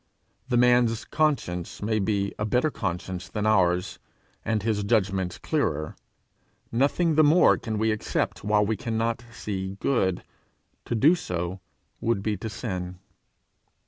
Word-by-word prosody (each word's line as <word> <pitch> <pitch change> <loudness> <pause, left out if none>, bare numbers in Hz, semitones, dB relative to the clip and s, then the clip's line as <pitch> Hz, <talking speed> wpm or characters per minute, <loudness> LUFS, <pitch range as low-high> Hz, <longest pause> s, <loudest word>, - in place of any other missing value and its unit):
The 120 - +2
man's 120 -2 +3
conscience 135 - -1
may 110 +1 0
be 100 -1 0
a - - 0
better 125 +8 +1
conscience 90 -2 -4
than 105 -1 -3
ours, 90 -3 +2 0.4
and 110 -3 -1
his 110 -2 0
judgment 95 -4 0
clearer; 80 - -1 0.8
nothing 145 +7 +2
the 155 +1 +5
more 155 +4 +6
can 110 -2 -4
we 110 +1 +2
accept 110 - -2
while 105 0 +3
we 110 +1 0
cannot 115 +1 -2
see 95 -4 -5
good: 95 -9 +1 0.6
to - - -2
do 145 +9 +5
so 90 - -3 0.4
would 110 -4 0
be 105 0 0
to 110 - -5
sin. 90 -5 -5
105 Hz, 140 wpm, -26 LUFS, 95-120 Hz, 0.8 s, more